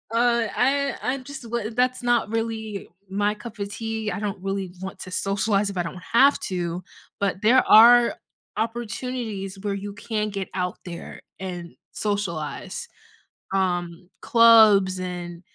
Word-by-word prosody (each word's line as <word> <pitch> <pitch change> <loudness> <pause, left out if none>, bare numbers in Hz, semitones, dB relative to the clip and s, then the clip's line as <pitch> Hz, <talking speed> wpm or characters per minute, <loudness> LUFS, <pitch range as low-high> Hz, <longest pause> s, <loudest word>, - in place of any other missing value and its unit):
Uh, 235 -1 +3
I 280 +2 +2
I'm 260 +1 -2
just 265 -3 -9
wo 230 -2 -2
that's 250 +2 0
not 240 -3 +2
really 220 -2 -3 0.2
my 205 +2 +1
cup 220 +1 -10
of 200 0 -4
tea. 225 -1 -3
I - - -3
don't 205 -2 -4
really 195 -1 -3
want 190 0 -7
to 185 - -8
socialize 200 +2 0
if 195 - -6
I 175 - +1
don't 180 +2 -7
have 275 +4 +6
to, 175 0 -3 0.4
but 195 -1 0
there 240 +5 +5
are 235 +2 +8 0.4
opportunities 225 -3 -4
where 205 0 -2
you 200 +1 -5
can 215 0 -3
get 195 -2 -5
out 180 -1 -2
there 170 -2 -8 0.2
and 180 -2 -6 0.2
socialize. 200 -8 -3 0.7
Um, 175 -2 -1
clubs 220 -6 +6
and, 175 -2 -6
205 Hz, 145 wpm, -24 LUFS, 190-230 Hz, 0.7 s, are